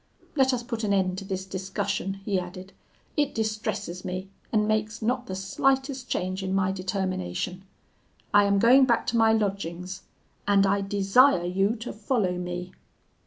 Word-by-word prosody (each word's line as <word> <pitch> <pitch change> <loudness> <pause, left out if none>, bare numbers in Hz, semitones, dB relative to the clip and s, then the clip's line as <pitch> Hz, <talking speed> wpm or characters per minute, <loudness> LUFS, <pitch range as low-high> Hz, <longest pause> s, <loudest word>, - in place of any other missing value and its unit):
Let 265 -2 +4
us 245 -2 -1
put 235 -1 -4
an 205 -1 +1
end 185 -1 +1
to 195 - -9
this 190 -1 -4
discussion' 195 +1 -3
he 195 -3 +1
added; 185 +2 -8 0.4
'it 290 -2 0
distresses 215 -4 -2
me, 185 +1 -4 0.2
and 210 -2 +2
makes 215 0 0
not 245 +2 0
the 185 - -4
slightest 265 +7 0
change 185 +1 -1
in 190 0 -1
my 190 -1 +2
determination: 185 - -3 0.7
I 205 0 +6
am 200 0 +3
going 250 +6 +6
back 235 -3 +2
to - - +2
my 225 -1 +5
lodgings, 190 -4 -2 0.5
and 200 -1 +5
I 200 +1 +2
desire 195 +1 +4
you 195 +5 +1
to 235 - -5
follow 215 -3 0
me.' 180 0 -5
195 Hz, 165 wpm, -26 LUFS, 185-225 Hz, 0.7 s, I